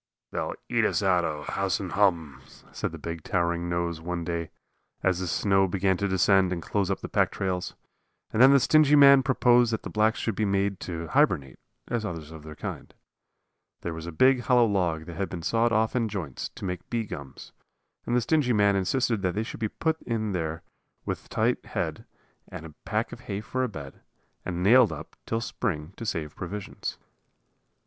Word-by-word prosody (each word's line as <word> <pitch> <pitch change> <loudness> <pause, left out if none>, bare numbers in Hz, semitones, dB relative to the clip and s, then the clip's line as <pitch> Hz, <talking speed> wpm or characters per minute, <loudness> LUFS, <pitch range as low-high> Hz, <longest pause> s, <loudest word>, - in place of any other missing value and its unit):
"They'll - - -3
eat - - +1
us 100 - +1
out 90 -2 +3
o' 75 -2 -3
house 95 +5 -1
and 95 -3 -5
hum," 80 -10 +1 0.3
said - - -3
the - - -7
big, 85 -1 -6
towering 85 0 -1
nose 85 -1 -2
one 85 0 -3
day, 85 -1 -3 0.5
as 95 -1 +2
the 95 - -3
snow 95 +4 +2
began 95 +1 +1
to 100 - 0
descend 95 0 +3
and 90 - -1
close 100 +3 -1
up 95 - -1
the - - -5
pack - - +2
trails. 90 -2 -3 0.6
And 110 - +2
then 130 - +9
the 140 - +6
stingy 150 +2 +5
man 140 -1 +8
proposed 125 -2 +4
that 110 - -2
the - - -6
blacks 110 +1 +2
should 115 - -1
be 110 - -1
made 100 -1 0
to 85 -2 -5
hibernate, 70 -4 +1 0.3
as 120 -2 -2
others 80 -6 -6
of 80 -1 -10
their 75 0 -10
kind. - - -7 0.9
There 85 - -4
was 80 +1 -7
a - - -4
big, 130 +10 +4
hollow 120 -1 +4
log 90 -7 0
that 85 -1 -9
had 100 0 -2
been 85 -2 -6
sawed 115 +5 +2
off 110 +2 +1
in 115 -3 +1
joints 90 -10 -5
to - - -7
make 90 -2 -5
bee 115 -2 -1
gums; 70 -8 -9 0.6
and 120 - +1
the 125 - +3
stingy 130 0 +2
man 100 -2 +4
insisted 110 +3 +1
that 90 -1 -1
they 110 - 0
should 110 - -8
be 110 -2 -1
put 160 +6 -1
in 110 -3 -2
there 80 -2 -3 0.4
with - - -4
a - - -32
tight - - 0
head, - - -4 0.4
and 85 -3 -8
a 80 - -10
pack 110 +1 -1
of - - -8
hay 100 0 -2
for 130 +4 -2
a 125 - -1
bed, 70 -9 -9 0.4
and 90 -1 -3
nailed 120 +3 +6
up - - -8
till 115 0 -1
spring 85 -9 -3
to 115 - -5
save 75 -6 -3
provisions. 100 +2 -5
95 Hz, 205 wpm, -27 LUFS, 85-115 Hz, 0.9 s, then